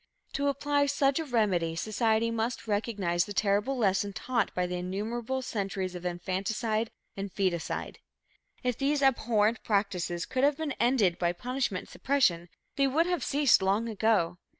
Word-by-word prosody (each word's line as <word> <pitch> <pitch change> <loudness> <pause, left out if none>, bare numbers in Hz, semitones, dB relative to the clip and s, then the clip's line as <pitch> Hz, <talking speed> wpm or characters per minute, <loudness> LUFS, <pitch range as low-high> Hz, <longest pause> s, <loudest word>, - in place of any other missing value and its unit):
To 280 0 0
apply 285 +1 +1
such 280 0 +2
a 320 - -2
remedy, 195 - +1
society 220 +4 +1
must 230 +1 -2
recognize 205 -5 0
the 205 - -7
terrible 205 +7 +1
lesson 200 -2 +1
taught 235 +1 -1
by 180 - +1
the 180 0 -3
innumerable 225 +8 -3
centuries 195 -5 -3
of 180 0 -4
infanticide 200 +5 -2 0.3
and 195 0 -5
foeticide. 180 -4 -2 0.6
If 250 -2 -1
these 280 +1 +1
abhorrent 230 -4 +2
practices 185 -4 -1
could 260 0 -1
have 285 0 +3
been 315 -2 -2
ended 230 -8 +2
by 175 -1 +1
punishment 250 -1 -2
and - - -17
suppression, 180 -12 +1 0.3
they 275 -1 +4
would 310 +5 +2
have 355 -1 -1
ceased 285 -6 +4
long 200 +4 +1
ago. 210 -6 +1
220 Hz, 155 wpm, -29 LUFS, 190-260 Hz, 0.6 s, they